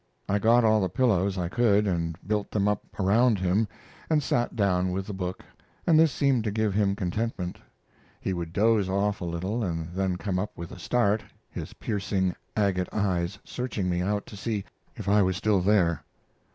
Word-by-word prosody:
I 100 +1 +1
got 115 +3 +5
all 110 -1 +4
the 95 - 0
pillows 100 -3 +2
I 90 -1 -1
could 105 +1 +3
and 85 -4 -1
built 105 0 -1
them 105 -1 +1
up 105 -1 0 0.2
around 110 +4 +4
him, 95 +4 +1 0.4
and 155 -2 +2
sat 120 -2 0
down 95 -3 +1
with 95 +1 -2
the 105 - -6
book, 90 -1 -4 0.4
and 160 -2 +5
this 160 -2 +5
seemed 135 -5 +2
to 105 - 0
give 110 -1 0
him 100 -1 +2
contentment. 95 -1 -3 0.6
He 95 - -2
would 85 -2 -4
doze 105 0 +2
off 100 +1 0
a - - -2
little 95 +7 -2
and 85 -2 -3
then 95 -1 0
come 90 0 -2
up 105 - -4
with 85 0 -7
a - - -9
start, 110 +2 +1 0.3
his - - -6
piercing, 95 -3 -1 0.2
agate 95 -3 +1
eyes 95 -2 0
searching 110 -7 -3
me 90 0 0
out 100 +2 -1
to - - -11
see 105 -1 -3 0.3
if - - -7
I 105 +1 +5
was 95 -1 +1
still 100 -1 +2
there. 90 -5 +2
100 Hz, 190 wpm, -27 LUFS, 90-110 Hz, 0.6 s, got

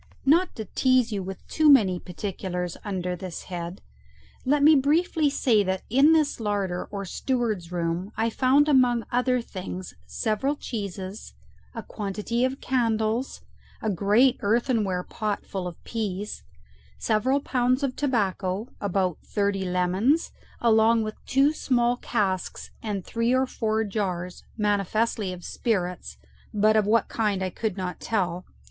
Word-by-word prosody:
Not 335 +6 +3
to 220 - -5
tease 255 +2 +2
you 200 -2 -2
with 190 0 -8
too 310 -1 +3
many 200 -10 +5
particulars 180 -1 -4
under 180 -3 -2
this 180 -1 -7
head, 175 +1 -6 0.6
let 285 +2 +3
me 310 +2 +8
briefly 305 +2 +3
say 240 -6 +3
that 190 -1 -2
in 275 +6 +6
this 310 -5 +2
larder 200 -4 -1
or 200 -1 -6
steward's 215 -5 -2
room 175 +3 -2
I 225 +1 +1
found 270 +5 +4
among 250 -5 +4
other 250 0 +2
things 185 -4 -7
several 240 +6 -1
cheeses, 200 -5 -6 0.4
a - - -5
quantity 210 +3 -3
of 260 +1 0
candles, 230 -1 0 0.4
a 220 - -1
great 210 +8 +3
earthenware 210 -4 +1
pot 210 0 -3
full 190 -2 -4
of 175 - -8
pease, 210 -3 -4 0.6
several 255 +6 +1
pounds 255 0 +1
of 265 -2 -1
tobacco, 205 -5 -1
about 190 -4 0
thirty 200 -2 -1
lemons, 185 - +1 0.3
along 225 0 +4
with 215 0 -7
two 275 +3 +3
small 245 -4 +1
casks 190 -7 -2
and 205 -4 -3
three 230 +2 0
or 260 +1 +3
four 220 -3 -1
jars, 185 -4 -3 0.2
manifestly 210 0 0
of 180 -1 -8
spirits, 180 -6 -2 0.3
but 215 0 +3
of 215 -2 +3
what 225 +2 +3
kind 205 -4 0
I 185 - -2
could 215 0 -3
not 180 -1 -4
tell. 185 -5 -1
215 Hz, 140 wpm, -26 LUFS, 190-250 Hz, 0.6 s, me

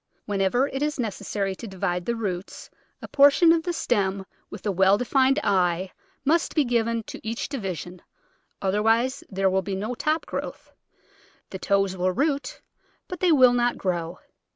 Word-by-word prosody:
Whenever 205 +6 +1
it 270 - -4
is 295 -1 -1
nec 225 -5 -1
essary 195 -1 -3
to 230 - -9
divide 180 -2 -3
the 235 - 0
roots 195 -4 -5 0.3
a - - -6
portion 285 +4 +5
of 330 -1 +3
the 350 - -3
stem 195 - -1 0.2
with 205 - -10
a 205 - +1
well 190 +2 +4
defined 265 +3 +2
eye 185 -1 +1 0.3
must 325 +4 +1
be 305 - +4
given 230 -1 0
to - - -9
each 225 +1 -4
division, 185 - -6 0.6
otherwise 225 +6 +1
there 195 -1 0
will 190 0 +2
be 195 0 -4
no 215 +6 -3
top 310 +6 -1
growth; - - -6 0.8
the 190 - -6
toes 195 -1 +1
will 185 0 0
root, 280 - -2 0.4
but 360 -2 -7
they 365 -2 +3
will 255 -5 +6
not 245 0 +1
grow. 170 -3 -3
210 Hz, 170 wpm, -25 LUFS, 190-260 Hz, 0.8 s, will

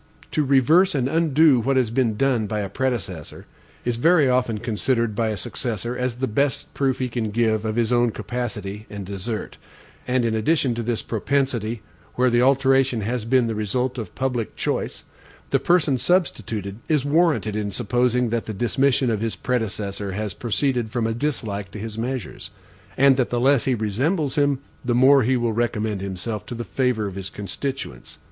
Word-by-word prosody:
To 155 - +1
reverse 145 +7 +4
and 130 -2 +1
undo 155 -2 +4
what 130 +3 +1
has 125 -4 +2
been 115 -3 +1
done 125 -5 +1
by 105 +1 -2
a 100 - -4
predecessor, 105 - -3 0.4
is 120 -1 0
very 160 +2 +4
often 125 -3 +1
considered 115 +1 0
by 115 +1 +1
a 110 -1 -2
successor 120 +2 -4
as 125 -1 -2
the 130 +2 -1
best 135 +4 -1
proof 135 -2 0
he 130 - -1
can 115 -3 -2
give 110 0 +1
of 110 0 -1
his 115 0 +1
own 120 0 +3
capacity 110 -3 -5
and 100 -2 -6
desert; 100 +3 -5 0.5
and 125 -1 +1
in 115 - +1
addition 130 +3 +1
to 115 - -3
this 115 -1 -2
propensity, 120 -2 -1 0.3
where 125 0 +3
the 120 0 +3
alteration 135 -2 +3
has 115 +2 -2
been 125 +1 +3
the 115 - -1
result 125 +5 -1
of 105 -6 -7
public 125 -4 -2
choice, - - -2 0.5
the - - +3
person 160 -7 +2
substituted 110 - -1
is 150 -4 +2
warranted 150 -8 +2
in 105 -1 -1
supposing 125 +2 +1
that 115 -1 -1
the 110 - -4
dismission 125 +3 +2
of 110 -2 -1
his 115 -1 -2
predecessor 105 -5 -3
has 105 0 -3
proceeded 120 - -1
from 115 0 -1
a 115 - 0
dislike 110 -7 -3
to 100 - -9
his 110 +1 -6
measures; 125 +1 -4 0.5
and 135 0 +5
that 130 - +1
the 120 - 0
less 135 +1 +3
he 130 - +2
resembles 130 - 0
him, 145 -2 +2 0.3
the 120 -2 0
more 135 +3 +6
he 130 +2 +2
will 120 -2 0
recommend 110 -3 -1
himself 100 +3 -4
to 120 - -7
the 120 - -4
favor 125 -4 0
of 100 - -4
his 95 0 -5
constituents. 105 - -6
120 Hz, 185 wpm, -23 LUFS, 110-130 Hz, 0.5 s, more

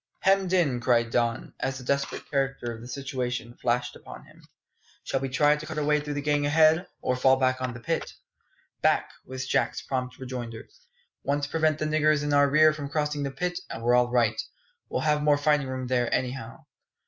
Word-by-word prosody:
Hemmed 195 -1 +3
in!" 155 -10 +2
cried 120 -2 +2
Don, 120 0 -1
as 135 0 -2
the 130 - -9
desperate 140 +2 -2
character 135 -4 -1
of 115 - -10
the 120 - -9
situation 125 -2 -4
flashed 120 0 0
upon - - -11
him. - - -19 0.6
"Shall 135 - -1
we 135 0 -3
try 145 +2 +4
to 150 0 -7
cut 160 - -6
our 150 - 0
way 150 +1 +3
through 150 0 -5
the 145 - -3
gang 145 0 +1
ahead, 160 +4 +4 0.2
or 125 - +1
fall 130 +1 +4
back 130 -1 +1
on 125 -2 -3
the - - -8
pit?" 115 - -3 0.7
"Back!" - - +2 0.2
was 130 0 -5
Jack's - - 0
prompt 130 -1 -3
rejoinder. 125 -3 -6 0.6
"Once 140 +1 0
prevent 155 0 +1
the 155 - -2
niggers 155 -1 +2
in 145 0 -1
our 145 0 +5
rear 155 +2 +5
from 145 -2 -6
crossing 150 0 -1
the 140 - -1
pit, 175 +6 -3
and 115 - -6
we're 120 +1 +3
all 125 0 +4
right. 120 -3 +2 0.5
We'll - - -1
have 150 -1 +2
more 150 -1 +4
fighting 145 -1 +2
room 130 -1 -4
there, 125 -1 0
anyhow." 125 -2 -3
135 Hz, 205 wpm, -27 LUFS, 125-150 Hz, 0.7 s, our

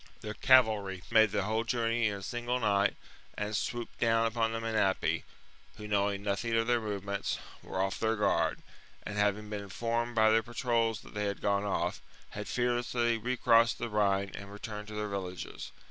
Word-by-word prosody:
Their 105 0 -5
cavalry 110 -7 +4
55 90 - -14
b.c. - - -10
made 110 -1 +7
the 100 -1 0
whole 110 +3 0
journey 115 -1 +1
in 105 - -1
a - - -9
single 120 +2 -2
night, 100 -3 +2 0.4
and 105 +1 -2
swooped 120 +3 -3
down 115 0 +3
upon 115 0 0
the 115 - -2
Menapii, 110 -4 +1 0.6
who, 105 -1 -7
knowing 100 -1 0
nothing 105 +3 -1
of 115 0 +2
their 120 0 +2
movements, 100 -2 -3 0.2
were - - -5
off 95 0 0
their 110 0 +1
guard, 105 - +1 0.4
and, 105 0 -4
having 105 +1 +1
been 105 -1 -3
informed 115 +4 -2
by 110 -1 +5
their 115 0 +4
patrols 115 -1 0
that - - -14
they 105 0 -2
had 100 -1 -2
gone 100 0 +1
off, 90 -3 -1 0.3
had 105 0 -6
fearlessly 120 -1 0
recrossed 115 -1 +3
the 120 - -3
Rhine 100 -2 +1
and 100 0 -8
returned 105 0 -7
to 105 - -8
their 105 0 -2
villages. 95 -3 -5
110 Hz, 190 wpm, -31 LUFS, 100-115 Hz, 0.6 s, made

